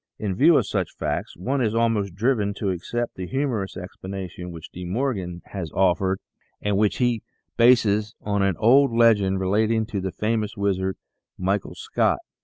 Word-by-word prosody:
In 105 -3 -2
view 150 - +5
of - - +2
such - - -2
facts - - -3
one 130 +10 -1
is 110 -2 0
almost 110 -5 +1
driven 105 -2 +1
to 100 -3 -1
accept 120 +7 -3
the 90 -1 -6
humorous 125 -7 -2
explanation 90 -1 -7
which 80 -1 -10
De 90 - -8
Morgan 95 -4 -2
has 95 -5 -4
offered 95 0 +2 0.4
and 105 -1 0
which 105 +1 +2
he 120 -3 +1 0.3
bases 110 -3 +4
on 100 -1 -1
an 95 -3 +1
old 135 +4 +5
legend 105 -5 +4
relating 110 +4 +1
to 105 -3 -4
the 95 0 -3
famous 110 +1 -1
wizard, 95 -1 0 0.4
Michael 95 +1 -1
Scott. - - +1
100 Hz, 165 wpm, -24 LUFS, 95-115 Hz, 0.4 s, view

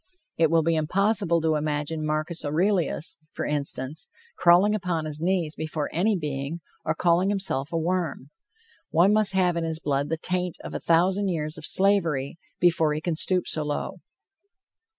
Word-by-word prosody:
It 160 -1 +3
will 165 0 +3
be 165 +1 +1
impossible 185 +2 +2
to 160 0 +1
imagine 150 +1 -2
Marcus 155 +2 -1
Aurelius, 165 +1 +1
for - - -4
instance, 145 0 0 0.3
crawling 180 +4 +4
upon 180 -6 -2
his 155 0 -4
knees 175 -3 0
before 155 -1 -4
any 195 +5 +1
being, 145 0 -4 0.2
or 155 - -1
calling 175 +3 +2
himself 190 -9 -1
a 165 - -1
worm. 165 -4 -2 0.6
One 180 +5 +4
must 215 -2 +3
have 180 -2 +2
in 170 - -1
his 160 -1 -2
blood 140 -2 -1
the 165 - -1
taint 180 +1 -2
of - - -7
a - - -3
thousand 185 +4 +2
years 155 -4 -2
of 160 0 -6
slavery, 170 -7 +1 0.2
before 165 -3 +3
he - - -2
can 170 +1 -2
stoop 180 +3 +1
so 155 - +1
low. 150 -1 -4
165 Hz, 170 wpm, -25 LUFS, 155-180 Hz, 0.6 s, crawling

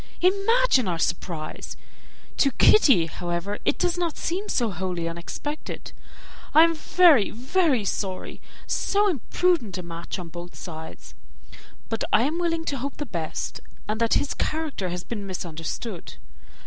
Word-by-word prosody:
Imagine 395 - +3
our 175 -2 0
surprise. 165 -1 -3 0.6
To 275 - +4
Kitty, 270 - +6
however, 175 +4 -3
it - - +2
does 355 -1 0
not 340 -3 -1
seem 380 +5 -2
so 235 -4 +1
wholly 180 -2 -3
unexpected. 170 - -6 0.6
I 315 - +10
am 335 0 +4
very, 320 - +5
very 260 - +1
sorry. 190 -1 -3 0.2
So 410 +1 +2
imprudent 330 - +1
a 180 - -5
match 170 0 -6
on 175 -3 -7
both 175 +1 -9
sides! 160 -2 -9 0.7
But 225 - -2
I 230 - +5
am 310 +6 0
willing 330 -2 0
to 280 -4 -2
hope 275 +2 -4
the 295 - -3
best, 170 - -4 0.3
and 215 +2 -2
that 230 - +3
his 285 - +1
character 305 - -2
has 175 0 -4
been 205 -4 -5
misunderstood. 175 +2 -5
230 Hz, 145 wpm, -25 LUFS, -, 0.7 s, I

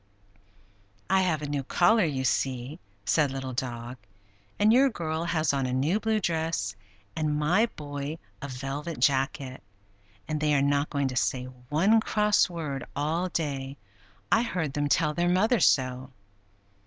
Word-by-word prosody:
"I 190 0 +5
have 165 -5 0
a - - -3
new 145 -1 -1
collar, 200 - +3
you 135 -4 -2
see," 130 +3 -1 0.3
said 150 +2 +3
Little 135 -1 -5
Dog. 120 0 -4 0.6
"And 210 +2 +4
your 270 +3 +5
girl 165 -6 -3
has 160 -4 +1
on 135 -2 0
a 125 - -2
new 150 +11 +1
blue 220 -1 +1
dress, 160 - -1 0.4
and 150 -1 0
my 175 +10 +3
boy 145 +1 -5 0.2
a 140 - -4
velvet 140 +5 -5
jacket. 135 -1 0 0.7
And 155 -1 -2
they 150 -1 +2
are 140 - +3
not 140 +1 +1
going 140 -2 0
to 130 - -6
say 125 0 0 0.3
one 190 +9 +4
cross 210 -2 +2
word 150 -6 -4
all 160 +6 -1
day; 140 -5 -3 0.5
I 225 - +5
heard 180 - -2
them 145 0 -1
tell 150 0 +2
their 175 +3 +1
mother 215 +6 +3
so." 130 0 +2
150 Hz, 155 wpm, -27 LUFS, 135-175 Hz, 0.7 s, I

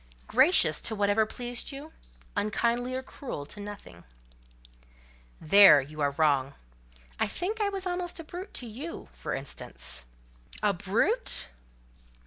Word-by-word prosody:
"Gracious 275 +10 +4
to 220 - -1
whatever 205 +1 +2
pleased 245 +3 -3
you—unkindly 245 -4 -3
or 260 - -3
cruel 255 - -7
to 205 - -8
nothing." 205 0 -9 1.4
"There 195 -1 +8
you 150 +3 -7
are 145 - +3
wrong; 140 -3 +2 0.6
I - - +2
think 420 +5 -3
I 410 - +2
was 390 -1 -4
almost 355 -1 -2
a - - -6
brute 355 +5 -8
to 250 - -2
you, 255 - -7
for - - -4
instance." 60 - -3 0.6
"A 205 -1 +3
brute! 210 - 0
235 Hz, 125 wpm, -28 LUFS, 195-320 Hz, 1.4 s, There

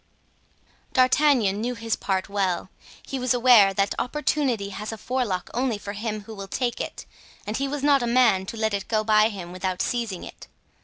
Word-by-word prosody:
D'Artagnan 255 -6 +3
knew 245 +2 -2
his 230 -1 -2
part 190 -1 -2
well; 190 -2 -1 0.4
he 270 - -3
was 250 -1 +1
aware 240 -5 +6
that 195 +1 0
opportunity 255 -6 -1
has 210 +3 -6
a 225 - -6
forelock 225 -6 -2
only 245 -3 0
for 205 0 -7
him 215 0 -4
who 220 +2 -10
will 195 -2 -8
take 240 +3 -2
it - - -6 0.4
and 210 - -3
he 275 - -1
was 285 0 -4
not 285 -2 +4
a 240 - -1
man 235 -6 +3
to 225 - -6
let 220 -1 0
it 200 -1 -3
go 215 -1 +1
by 215 0 +4
him 185 -5 -8
without 185 0 -3
seizing 230 -7 -2
it. - - -11
220 Hz, 195 wpm, -24 LUFS, 200-250 Hz, 0.4 s, aware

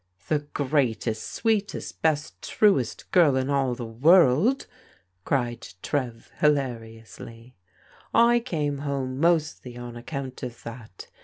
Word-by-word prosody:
"The 155 - +2 0.2
greatest, 125 -6 0
sweetest, 215 -3 -2
best, 155 -1 0
truest 190 - +1
girl 160 -7 +5
in 130 +1 0
all 135 -3 +1
the 120 - -6
world! 160 - +4 0.3
" 90 0 -40
cried 120 -3 -1 0.2
Trev 125 -5 -3
hilariously. 115 -4 -2 0.3
" - - -28 0.2
I 240 - +4
came 150 - -2
home 135 -2 -3
mostly 155 -7 0
on 120 -1 -8
account 130 +2 -6
of 120 -2 -7
that. 115 -5 -10
130 Hz, 125 wpm, -25 LUFS, 120-150 Hz, 0.3 s, girl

